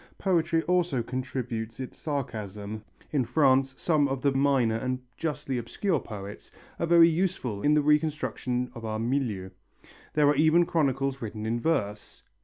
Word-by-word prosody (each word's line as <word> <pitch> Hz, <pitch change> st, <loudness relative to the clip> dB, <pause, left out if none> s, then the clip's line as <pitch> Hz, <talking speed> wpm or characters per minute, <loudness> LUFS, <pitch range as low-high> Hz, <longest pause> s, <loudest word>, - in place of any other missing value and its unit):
Poetry 170 Hz, -3 st, +1 dB
also 175 Hz, -8 st, +1 dB
contributes 120 Hz, -2 st, -4 dB
its 130 Hz, -, -6 dB
sarcasm. 110 Hz, -7 st, -5 dB, 0.3 s
In 140 Hz, -4 st, +2 dB
France 130 Hz, +1 st, +3 dB
some 155 Hz, -4 st, +2 dB
of 135 Hz, -1 st, -3 dB
the 140 Hz, -, +4 dB
minor 135 Hz, -5 st, +2 dB
and 130 Hz, +2 st, -2 dB, 0.2 s
justly 140 Hz, -5 st, -3 dB
obscure 160 Hz, -, -1 dB
poets 100 Hz, -3 st, -9 dB, 0.3 s
are 170 Hz, -, 0 dB
very 170 Hz, 0 st, +7 dB
useful 165 Hz, -, -1 dB
in 150 Hz, +5 st, +4 dB
the 150 Hz, -, +3 dB
reconstruction 140 Hz, -5 st, 0 dB
of 115 Hz, -2 st, -9 dB
our 110 Hz, -1 st, -2 dB
milieu. 115 Hz, -6 st, -1 dB, 0.6 s
There 150 Hz, -1 st, +4 dB
are 145 Hz, -, +4 dB
even 160 Hz, +4 st, +4 dB
chronicles 135 Hz, -4 st, 0 dB
written 110 Hz, -1 st, -5 dB
in 115 Hz, +2 st, -1 dB
verse. 105 Hz, -9 st, -2 dB
135 Hz, 150 wpm, -27 LUFS, 115-155 Hz, 0.6 s, very